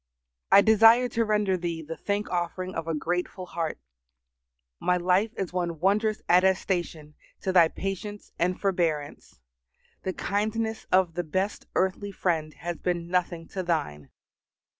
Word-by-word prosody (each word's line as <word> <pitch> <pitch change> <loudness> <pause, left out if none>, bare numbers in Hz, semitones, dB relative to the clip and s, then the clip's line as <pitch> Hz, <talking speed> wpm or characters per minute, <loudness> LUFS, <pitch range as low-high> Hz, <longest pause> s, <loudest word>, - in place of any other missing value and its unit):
I 200 - +9
desire 225 +3 +6
to 230 - +1
render 210 -3 +1
Thee 170 -2 -3
the 165 +2 -6
thank 205 +3 -2
offering 180 +1 -2
of 165 0 -4
a 165 - -1
grateful 180 +4 -2
heart. 165 -3 -4 1.0
My 180 - +2
life 185 +5 +2
is 190 -3 -3
one 170 -3 -2
wondrous 210 +4 +1
attestation 180 -4 +1 0.3
to 190 - -1
Thy 175 -3 +6
patience 195 +3 -6
and 180 +2 +1
forbearance. 165 -7 -2 0.6
The 190 - -3
kindness 220 +3 -2
of 185 -2 +3
the 175 - -2
best 185 +6 -2
earthly 190 +2 0
friend 165 -5 -1
has 170 +2 -5
been 175 -1 -2
nothing 175 -2 -1
to 190 - -3
Thine. 150 - -2
180 Hz, 140 wpm, -27 LUFS, 170-200 Hz, 1.0 s, I